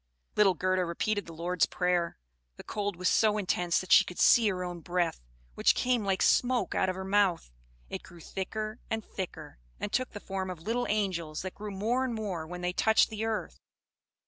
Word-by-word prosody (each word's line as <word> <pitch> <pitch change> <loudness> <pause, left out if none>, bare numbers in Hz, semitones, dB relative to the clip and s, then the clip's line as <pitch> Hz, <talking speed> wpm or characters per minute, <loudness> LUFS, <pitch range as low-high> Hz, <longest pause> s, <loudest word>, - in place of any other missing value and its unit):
Little 200 -3 +5
Gerda 185 +2 +1
repeated 205 +4 -1
the 165 - -9
Lord's 170 +1 +1
Prayer. 180 -1 0 0.4
The - - -11
cold 205 -2 -3
was 180 +1 -1
so 215 -1 +3
intense 180 -3 +1
that 185 - -7
she - - +9
could 180 - -9
see 230 -3 +6
her 180 -2 -2
own 175 -1 -5
breath, 175 - -1 0.3
which - - +3
came 250 -3 +1
like 195 -1 +1
smoke 245 -5 +2
out 190 - +1
of 185 - -2
her 190 0 -5
mouth. 190 - +2 0.4
It - - -5
grew 170 - -14
thicker 215 +6 -5
and 220 -1 -2
thicker, 185 - -7 0.2
and 205 - -4
took 255 0 0
the 205 - -6
form 190 -2 -4
of 170 -3 -7
little 235 +5 -1
angels, 180 -7 -1
that 185 - -5
grew 210 +1 -7
more 220 +6 0
and 250 -3 -2
more 190 -7 -4
when 180 +1 -7
they 180 0 -1
touched 220 +4 +4
the 220 0 -3
earth. 225 -1 -3
190 Hz, 200 wpm, -30 LUFS, 180-215 Hz, 0.4 s, she